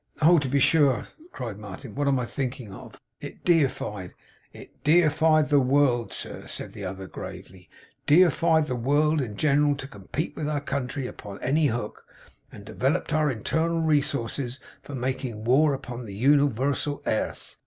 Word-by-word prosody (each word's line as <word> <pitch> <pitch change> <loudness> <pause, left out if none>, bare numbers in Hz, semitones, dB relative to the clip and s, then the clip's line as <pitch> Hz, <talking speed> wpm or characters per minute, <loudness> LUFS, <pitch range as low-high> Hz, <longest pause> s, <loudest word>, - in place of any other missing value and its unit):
'Oh! 165 +2 +6
to 140 - -2
be 140 +2 +2
sure,' 140 -5 +4 0.3
cried 115 -5 -6
Martin. 105 +3 -9
'What 145 0 -1
am 140 -1 +3
I 125 - -2
thinking 125 -5 -5
of! - - -12 0.2
It - - -10
defied 130 - 0 0.2
' - - -36
'It - - -15
defied 155 -1 +4
the 145 -1 +5
world, 130 -3 +2
sir,' - - -7
said - - -5
the 105 - -8
other, 95 0 -5
gravely. 95 -1 -10 0.4
'Defied 160 0 +4
the 130 - -3
world 145 +5 +2
in 110 -6 -5
general 145 +1 +3
to 135 0 -8
com 100 -8 -14
pete 155 +5 -2
with 150 -1 -3
our 150 -1 0
country 140 -1 -3
upon 100 -5 -8
any 150 +4 +2
hook; 115 -4 -4 0.5
and - - -12
devellop'd 150 +5 -1
our 155 -1 +2
internal 160 +8 -1
resources 140 -4 -1 0.2
for 145 - -8
making 125 -3 -3
war 140 +6 +4
upon 125 -2 -7
the 100 -3 -8
universal 140 +3 +1
airth. 110 - -3
140 Hz, 165 wpm, -26 LUFS, 120-150 Hz, 0.5 s, Oh